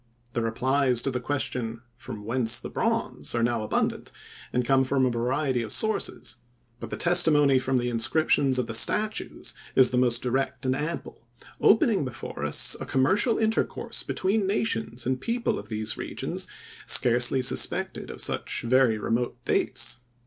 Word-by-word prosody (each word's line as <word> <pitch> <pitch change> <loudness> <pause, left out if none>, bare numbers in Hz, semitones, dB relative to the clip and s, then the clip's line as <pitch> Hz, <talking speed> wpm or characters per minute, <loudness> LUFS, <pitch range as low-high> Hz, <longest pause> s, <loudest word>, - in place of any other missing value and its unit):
The 120 - -1
replies 125 +2 +1
to 135 - -1
the 125 - -2
question, 120 -3 -3
from 110 -3 -9
whence 115 0 0
the - - -8
bronze? - - -1
are 115 - +1
now 120 -1 0
abundant, 110 - -2 0.4
and 125 0 -1
come 135 +1 +3
from 130 0 +1
a 125 - +1
variety 125 +2 -1
of 110 -2 -5
sources, 220 0 -1 0.4
but - - -7
the - - -5
testimony 150 -6 +4
from 130 0 0
the 120 0 -1
inscriptions 130 +3 +2
of 125 - 0
the 115 - -6
statues 210 - +1 0.2
is 130 -1 +6
the 125 - +1
most 120 -1 +2
direct 130 +2 -2
and 130 0 +1
ample, 150 -5 -6 0.3
opening 215 -4 +3
before 130 -3 -7
us - - 0
a - - -5
commercial 190 - +2
intercourse 220 0 -1
between 195 +1 -1
nations 205 - -2
and 130 0 -1
people 230 - -1
of - - -11
these 110 -1 -2
regions - - -4 0.4
scarcely 125 +2 +4
suspected - - +1
of - - -5
such - - -1
very 120 -2 +3
remote 120 +3 -2
dates. - - 0
130 Hz, 160 wpm, -26 LUFS, 120-145 Hz, 0.4 s, is